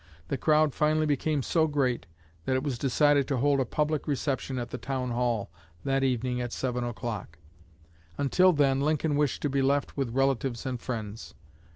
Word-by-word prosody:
The - - -1
crowd 155 -2 +3
finally 155 +1 +2
became 145 0 0
so 160 +3 +2
great 135 -5 0 0.4
that 130 - +1
it 130 - 0
was 135 -5 -2
decided 145 +1 +3
to 140 - 0
hold 140 +2 +2
a 130 - +1
public 150 +4 -1
reception 135 -2 -1
at 120 -1 -4
the 125 - -5
Town 130 -2 -3
Hall 120 -3 -1 0.3
that 135 0 +1
evening 125 -1 0
at 120 -1 -4
seven 125 -2 -2
o'clock; 115 -8 -5 0.8
until 180 +7 +4
then 140 -4 +2
Lincoln 150 0 +1
wished 145 -1 0
to 145 - +1
be 140 0 +1
left 140 +1 +1
with 135 -3 0
relatives 135 -2 0
and 125 -3 -3
friends. 110 -2 -6
135 Hz, 180 wpm, -28 LUFS, 125-145 Hz, 0.8 s, until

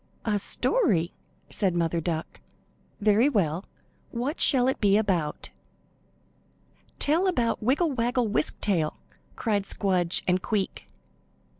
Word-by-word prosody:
"A 210 -2 +1
story?" 195 - +1 0.4
said 190 -4 +1
Mother 170 -1 0
Duck. 160 0 -4 0.6
"Very 215 +6 +4
well. 180 - 0 0.4
What 255 +6 -3
shall 255 -3 +5
it 265 - -1
be 200 -1 +4
about?" 180 -8 -1 1.5
"Tell 330 +6 +2
about 240 -11 0
Wiggle 285 +8 +1
Waggle 245 -1 0
Wisk 150 -6 -1
Tail!" 170 -7 0 0.4
cried 205 -4 -1
Squdge 180 -3 +1
and 180 0 +2
Queek. 205 -1 -3
205 Hz, 115 wpm, -26 LUFS, 175-245 Hz, 1.5 s, shall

